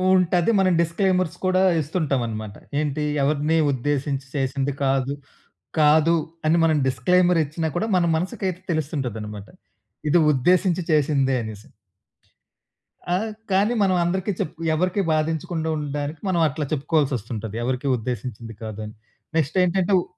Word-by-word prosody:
ఉంటది. 180 +1 +2
మనం 185 -2 +3
డిస్క్లైమర్స్ 185 0 0
కూడా 185 0 +3 0.2
ఇస్తుంటాం 145 -4 -1
అనమాట. 110 -2 -6 0.2
ఏంటి, 150 0 -1 0.2
ఎవరిని 150 +3 +1
ఉద్దేశించి 140 +1 -1
చేసింది 135 0 -1
కాదు. 135 +1 +1 0.7
కాదు 155 +2 +5 0.3
అని 165 +2 +4
మనం 160 -1 +3
డిస్క్లైమరిచ్చినా 165 0 +2
కూడా 220 - 0
మన 175 - +3
మనసుకయితే 185 +1 -3
తెలుస్తుంటదనమాట. 120 -10 -3 0.6
ఇది 175 - +5
ఉద్దేశించి 180 +6 +2
చేసిందే 140 -3 +2
అనేసి. 110 -1 -8 1.5
ఆ! - - +3 0.4
కానీ 205 +5 +3
మనం 185 -2 +2
అందరికి 190 +4 -1
చెప్పు 160 +1 -4
ఎవరికీ 185 +5 +1
బాధించకుండా 160 +1 -1
ఉండడానికి 145 +1 -4
మనం 175 - +1
అట్లా 150 +1 -3
చెప్పుకోవాల్సొస్తుంటది. 130 -8 -1
ఎవరికీ 130 +2 -2
ఉద్దేశించింది 115 0 -5
కాదని. 110 0 -6 0.4
నెక్స్టేంటంటే 180 +5 +1
ఉ - - -2
150 Hz, 115 wpm, -23 LUFS, 135-175 Hz, 1.5 s, కాదు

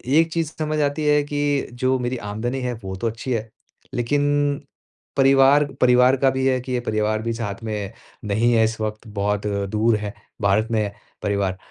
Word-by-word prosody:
एक 165 0 +4
चीज़ 165 -2 -1
समझ 155 0 -1
आती 145 +2 0
है 150 0 +4
कि 145 -1 -1
जो 130 +2 +1
मेरी 125 +1 -2
आमदनी 115 +4 -3
है, 125 -1 -2
वो 95 -5 -7
तो 105 +5 -2
अच्छी 115 +3 -4
है। 110 -1 -3 0.4
लेकिन 145 +3 +1 0.6
परिवार 135 +1 +6 0.2
परिवार 125 +1 +5
का 135 +1 +3
भी 130 0 -1
है 130 -1 +2
कि 130 +1 -7
ये 125 - +1
परिवार 110 -1 0
भी 115 +1 -2
साथ 115 -1 -5
में 105 -3 -4 0.3
नहीं 110 +4 +2
है 115 - +4
इस 110 0 -3
वक़्त, 110 +1 -4
बहुत 105 0 -1 0.2
दूर 110 +2 +2
है, 105 -1 -5 0.3
भारत 100 +2 +2
में 110 -1 +2
है 100 -1 -3 0.3
परिवार। 100 -2 0
120 Hz, 190 wpm, -22 LUFS, 105-135 Hz, 0.6 s, परिवार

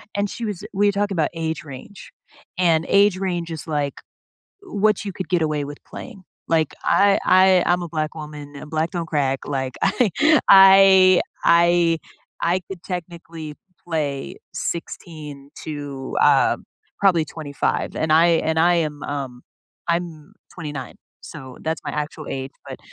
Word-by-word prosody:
and 200 0 0
she 235 - -5
was 205 -3 -5
we 205 +1 +2
were - - +2
talking 200 0 -1
about 160 -3 +1
age 160 -1 -3
range, 145 +7 -11 0.5
and 165 -3 +3
age 200 -1 +4
range 175 -3 -3
is, 160 - -6
like, 145 -3 -2 0.7
w 210 - -7
what 215 -1 +3
you 200 - -4
could 185 0 -6
get 175 -2 +2
away 150 -2 -1
with 145 +1 -8
playing, 225 -7 -10 0.3
like, 160 -2 +1
I 200 0 +4
I 185 -1 +5
I'm 175 0 +2
a 175 - -5
black 155 -1 -3
woman, 150 -2 -9
and 150 - -10
black 160 +1 -1
don't 170 -2 -3
crack, 140 -4 0
like, 130 -2 -3 0.2
I 250 - +2 0.4
I, 190 -1 +8 0.2
I 170 -1 +4 0.4
I 175 +2 +1
could 185 -3 -8
technically 165 -3 -7 0.3
play 145 -5 -3 0.2
16 150 -4 -6
to, 145 -3 -6
uh, - - +4 0.4
probably 180 -5 +4
25 145 -3 -3
and 160 0 0
I 165 +2 +6 0.2
and 160 0 +1
I 175 +2 +4
am, 145 -1 -13
um 135 -4 -5 0.5
I'm 170 -3 -3 0.2
29 145 -6 -7 0.3
so, 130 -1 -10
that's 160 0 -3
my - - -4
actual 150 +1 -5
age, 135 0 -4 0.2
but - - -7
165 Hz, 155 wpm, -22 LUFS, 150-185 Hz, 0.7 s, I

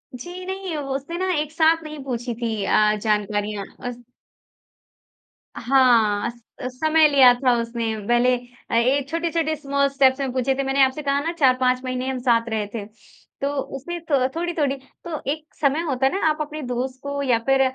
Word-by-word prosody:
जी 355 +8 -8
नहीं, 380 -2 -4
वो 275 -2 -3
उसने 280 +5 -5
ना 375 +1 0
एक 300 0 -3
साथ 325 0 +3
नहीं 305 -2 -8
पूछी 245 -2 -3
थी 225 -3 -2
अ, 210 +1 +3
जानकारियाँ 210 -1 -1 0.2
अस 245 -1 -5 1.6
हाँ, 235 -5 +3
स 235 0 -12 0.4
समय 315 0 +5
लिया 270 -4 +7
था 250 0 +2
उसने। 230 -1 -3
पहले 245 +1 +4 0.4
अ, - - -3
एक 260 +4 +2
छोटे-छोटे 330 -1 -1
स्मॉल 280 -1 0
स्टेप्स 270 -1 +3
में 270 -2 -1
पूछे 260 +1 +1
थे। 275 - -1
मैंने 270 0 +3
आपसे 265 +3 +1
कहा 280 -1 +1
ना 325 +4 -2
4-5 255 -2 +3
महीने 255 0 -3
हम 260 -1 -2
साथ 235 -2 +2
रहे 215 -2 -2
थे। 215 -3 -4 0.6
तो 280 - 0 0.3
उसमें 345 +6 -6
थ 260 -3 +3
थोड़ी-थोड़ी 330 -5 -1 0.3
तो 325 -3 -4
एक 305 +1 -4
समय 290 +2 +1
होता 265 -2 0
है 270 - +3
ना 390 - -1
आप 305 -1 +1
अपने 305 +1 -5
दोस्त 255 +1 -3
को 280 0 -3
या 250 -4 +3
फिर 270 0 +4
270 Hz, 185 wpm, -23 LUFS, 245-300 Hz, 1.6 s, लिया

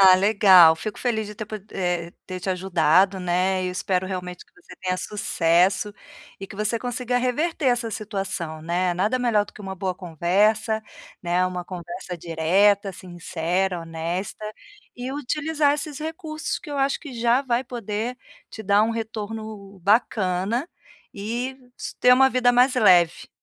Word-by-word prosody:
Ah, 190 -1 +9
legal, 185 -4 +7
fico 210 +5 -5
feliz 220 -4 -1
de 210 - -9
ter 215 - -6
podi 210 -2 -8
eh, 175 -2 -1
de - - -41
ter 185 -1 -6
te 190 - -2
ajudado, 185 +1 +3
né, 185 +1 0
e - - -1
espero 185 0 -1
realmente 180 -2 -6 0.4
tenha 185 -1 -1
sucesso, 190 0 +1 0.5
e 195 - -7
que 210 - -11
você 215 +3 -1
consiga 245 +1 -1
reverter 290 +6 -1
essa 240 -2 +1
situação, 195 -7 -4
né, 175 +2 0
nada 210 +8 +1
melhor 230 -4 +2
do - - -16
que - - -14
uma 190 0 -5
boa 190 -1 -3
conversa, 200 +6 +1 0.4
né, 175 +1 +1
uma 180 -1 -4
conversa 175 0 -7
direta, 190 +5 +2
sincera, 175 +1 -2
honesta, 165 +5 -4 0.5
e 250 +1 -5
utilizar 295 +1 0
esses 295 0 -5
recursos 315 0 -4
que 295 - -10
eu 285 - -3
acho 275 0 +1
que 290 -5 -9
já 240 +3 +3
vai 250 -1 0
poder 235 0 -4 0.3
te 220 - -8
dar 205 +1 +4
um 225 - -1
retorno 215 -3 -6
bacana, 205 - +1 0.4
e 240 +6 -4 0.2
s - - -6
ter 250 - +6
uma 265 +1 +6
vida 250 -1 +3
mais 250 +2 +4
leve. 180 -8 +4
200 Hz, 160 wpm, -24 LUFS, 180-240 Hz, 0.5 s, Ah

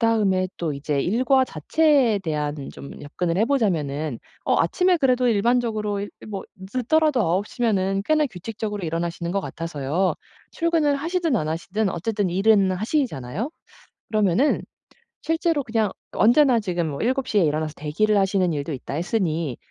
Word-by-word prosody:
그다음에 205 -5 +2
또 165 -3 -2
이제 140 0 -2
일과 260 - +3
자체에 260 - +2
대한 150 -4 -2 0.2
좀 140 - -10
접근을 170 +4 -3
해 215 - +4
보자면은 155 - 0 0.3
어 - - +2
아침에 360 -1 +2
그래도 255 -4 +2
일반적으로 220 -2 +1
이 205 - -4 0.2
뭐 200 -2 -5 0.2
늦더라도 255 +7 +1
9:00 200 +7 -1
면은 195 -3 +1
꽤나 310 -1 +3
규칙적으로 210 -1 -5
일어나시는 170 +1 -3
것 195 +1 0
같아서요. 165 +1 -2 0.4
출근을 325 -4 +1
하시든 330 -2 0
안 155 -5 -1
하시든 190 +6 -1
어쨌든 200 +2 -1
일은 195 0 +3
하시잖아요? 215 - -2 0.6
그러면은 215 - +2 0.6
실제로 325 -2 +1
그냥 220 -4 0 0.2
언제나 245 +2 +4
지금 175 -6 -1
뭐 140 -2 -5
7:00 255 -2 +1
에 195 - +4
일어나서 155 0 0
대기를 200 +8 +1
하시는 190 -3 +2
일도 145 +1 -3
있다 135 0 -6
했으니 165 - -1
205 Hz, 345 characters per minute, -23 LUFS, 170-245 Hz, 0.6 s, 해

